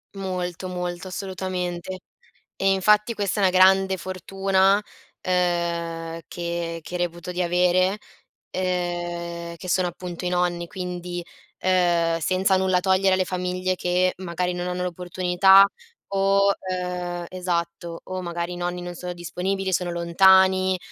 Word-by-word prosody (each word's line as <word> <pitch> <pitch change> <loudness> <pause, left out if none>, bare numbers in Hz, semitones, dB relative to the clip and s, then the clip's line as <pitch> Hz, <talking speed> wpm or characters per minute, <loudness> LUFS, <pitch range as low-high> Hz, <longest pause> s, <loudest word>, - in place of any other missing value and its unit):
Molto, 185 -2 -4
molto 180 0 -4
assolutamente. 185 -1 -4 0.6
E 195 0 +2
infatti 210 +4 +3
questa 205 0 -1
è - - +1
una 185 - +2
grande 190 0 +5
fortuna, 190 +2 +1 0.4
ehm, 170 -2 -1
che 170 -1 -4
che 180 - -6
reputo 175 0 -3
di 180 0 -1
avere, 180 +2 +2 0.6
ehm, 175 -2 -3
che 185 +2 -10
sono 180 0 +2
appunto 175 0 -6
i 180 - +1
nonni. 175 -1 0
Quindi, 180 -1 -5 0.3
ehm, 175 -3 +2
senza 190 +4 +2
nulla 185 -1 +2
togliere 190 0 +3
alle 185 0 +1
famiglie 185 0 -1
che 180 +1 +1
magari 180 0 -2
non 175 0 -3
hanno 180 0 -2
l'opportunità 180 +2 +4 0.4
o, 195 0 +3 0.2
ehm 180 -1 -3
esatto 170 -2 -3
o 185 0 -5
magari 170 0 -4
i - - -6
nonni 175 0 -3
non 175 0 -6
sono 180 +1 -6
disponibili, 190 +2 -3
sono 180 0 0
lontani, 185 +2 +4
180 Hz, 130 wpm, -24 LUFS, 175-185 Hz, 0.6 s, grande